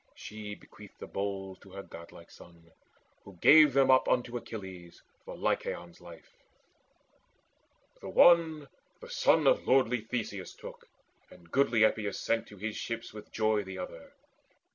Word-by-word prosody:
She 105 Hz, -1 st, -8 dB
bequeathed -, -, -16 dB
The -, -, -7 dB
bowls 95 Hz, -1 st, -5 dB
to 100 Hz, -, -17 dB
her 100 Hz, 0 st, -7 dB
godlike 85 Hz, -1 st, -13 dB
son, 85 Hz, -1 st, -17 dB, 0.5 s
who 100 Hz, -, -14 dB
gave 150 Hz, -, +7 dB
them 135 Hz, 0 st, +4 dB
up 130 Hz, -, +4 dB
Unto 120 Hz, -1 st, 0 dB
Achilles 95 Hz, -7 st, -9 dB, 0.2 s
for -, -, -9 dB
Lycaon's 85 Hz, -1 st, -3 dB
life. 85 Hz, -2 st, -14 dB, 1.7 s
The -, -, -7 dB
one 160 Hz, -4 st, +4 dB, 0.3 s
the 480 Hz, 0 st, -12 dB
son -, -, +3 dB
of -, -, +3 dB
lordly 125 Hz, -3 st, +3 dB
Theseus 110 Hz, -4 st, -5 dB
took, -, -, -12 dB, 0.4 s
And 85 Hz, -1 st, -18 dB
goodly 120 Hz, -5 st, +3 dB
Epeius 110 Hz, -2 st, 0 dB
sent 115 Hz, 0 st, -1 dB
to 105 Hz, -, -14 dB
his 110 Hz, +2 st, -5 dB
ship 115 Hz, 0 st, -4 dB
with 105 Hz, -1 st, -11 dB
joy 110 Hz, -1 st, +1 dB
The 95 Hz, -1 st, -8 dB
other. 85 Hz, -3 st, -9 dB
105 Hz, 145 wpm, -30 LUFS, 95-125 Hz, 1.7 s, gave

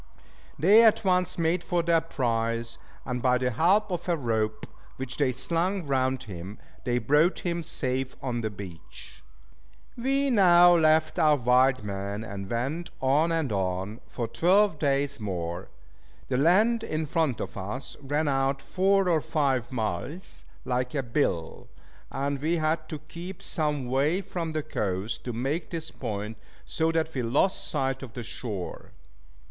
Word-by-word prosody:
They 200 Hz, +9 st, +7 dB
at 220 Hz, -1 st, +4 dB
once 180 Hz, -1 st, +2 dB
made 170 Hz, +1 st, +1 dB
for 175 Hz, -1 st, 0 dB
their 165 Hz, -1 st, +3 dB
prize; 115 Hz, -6 st, -2 dB, 0.3 s
and 125 Hz, -1 st, -3 dB
by 125 Hz, 0 st, +3 dB
the 125 Hz, 0 st, 0 dB
help 190 Hz, -, +3 dB
of 175 Hz, 0 st, -3 dB
a 170 Hz, -, +2 dB
rope, 110 Hz, -5 st, -1 dB, 0.3 s
which 130 Hz, -1 st, -4 dB
they 140 Hz, -3 st, +2 dB
slung 170 Hz, +8 st, 0 dB
round 130 Hz, -2 st, 0 dB
him, 95 Hz, 0 st, -8 dB, 0.3 s
they 120 Hz, -1 st, +1 dB
brought 150 Hz, +7 st, +3 dB
him 170 Hz, -1 st, -2 dB
safe 130 Hz, -5 st, -2 dB
on 120 Hz, -3 st, -2 dB
the 110 Hz, -, -1 dB
beach. 95 Hz, -5 st, -10 dB, 0.7 s
We 270 Hz, +3 st, +1 dB
now 175 Hz, -5 st, +7 dB
left 155 Hz, -1 st, +3 dB
our 150 Hz, -1 st, +5 dB
wild 125 Hz, -1 st, +3 dB
men, 100 Hz, +1 st, -4 dB
and 100 Hz, -2 st, -6 dB
went 135 Hz, +9 st, -2 dB
on 145 Hz, +5 st, +2 dB
and 160 Hz, -6 st, 0 dB
on, 95 Hz, +2 st, -2 dB
for 120 Hz, -2 st, -4 dB
twelve 175 Hz, -, +3 dB
days 140 Hz, -1 st, 0 dB
more. 90 Hz, -4 st, -4 dB, 0.6 s
The 125 Hz, -, +1 dB
land 215 Hz, +9 st, +4 dB
in 155 Hz, -7 st, -2 dB
front 155 Hz, -5 st, 0 dB
of -, -, -5 dB
us 105 Hz, +7 st, -5 dB
ran 145 Hz, +3 st, -1 dB
out 135 Hz, 0 st, +1 dB
four 195 Hz, +4 st, +2 dB
or 165 Hz, -3 st, +3 dB
five 140 Hz, -7 st, 0 dB
miles, 110 Hz, -, -4 dB, 0.2 s
like 125 Hz, +2 st, -1 dB
a 135 Hz, -, 0 dB
bill; 115 Hz, -, -1 dB, 0.4 s
and 140 Hz, 0 st, -2 dB
we 160 Hz, +3 st, +1 dB
had 155 Hz, 0 st, -1 dB
to 155 Hz, -, -4 dB
keep 170 Hz, +5 st, -9 dB
some 150 Hz, -5 st, -1 dB
way 140 Hz, +9 st, +1 dB
from 170 Hz, -4 st, -4 dB
the 155 Hz, -1 st, -1 dB
coast, 100 Hz, -6 st, -3 dB
to 125 Hz, -, -2 dB
make 135 Hz, +8 st, -2 dB
this 165 Hz, -2 st, -5 dB
point, 105 Hz, +1 st, -5 dB, 0.3 s
so 160 Hz, 0 st, 0 dB
that 160 Hz, 0 st, -1 dB
we 130 Hz, -, -1 dB
lost 130 Hz, +11 st, +1 dB
sight 135 Hz, -3 st, -1 dB
of 125 Hz, -5 st, -9 dB
the 120 Hz, -, -6 dB
shore. 105 Hz, -5 st, -6 dB
140 Hz, 160 wpm, -27 LUFS, 115-165 Hz, 0.7 s, They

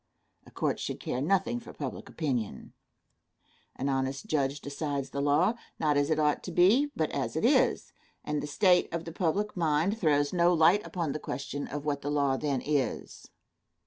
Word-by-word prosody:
A -, -, -12 dB
court -, -, -1 dB
should -, -, -4 dB
care 125 Hz, -, -3 dB
nothing 195 Hz, -, +1 dB
for 235 Hz, -, -12 dB
public 135 Hz, -4 st, -6 dB
opinion. 125 Hz, -, -3 dB, 1.0 s
An 135 Hz, -, -3 dB
honest 135 Hz, +3 st, -1 dB
judge 145 Hz, -6 st, 0 dB
decides 140 Hz, -1 st, -4 dB
the 140 Hz, -, -2 dB
law, 150 Hz, +9 st, +3 dB, 0.2 s
not 150 Hz, -2 st, +1 dB
as 145 Hz, +1 st, +2 dB
it 155 Hz, -, +2 dB
ought 150 Hz, -1 st, +2 dB
to 185 Hz, -, -5 dB
be, 215 Hz, -, +4 dB
but -, -, -1 dB
as -, -, -3 dB
it -, -, 0 dB
is, -, -, +2 dB, 0.3 s
and 150 Hz, 0 st, -2 dB
the -, -, -5 dB
state 180 Hz, +4 st, +3 dB
of 170 Hz, 0 st, -4 dB
the 165 Hz, -, -6 dB
public 195 Hz, +5 st, -1 dB
mind 170 Hz, +5 st, +1 dB
throws 145 Hz, -4 st, +2 dB
no 175 Hz, 0 st, +4 dB
light 170 Hz, +6 st, +5 dB
upon 170 Hz, -5 st, -2 dB
the 155 Hz, -, -4 dB
question 140 Hz, 0 st, -5 dB
of 145 Hz, 0 st, -6 dB
what 145 Hz, -1 st, -1 dB
the 145 Hz, -, -3 dB
law 140 Hz, -2 st, +2 dB
then 140 Hz, -2 st, -1 dB
is. 145 Hz, -4 st, -2 dB
150 Hz, 185 wpm, -29 LUFS, 140-175 Hz, 1.0 s, light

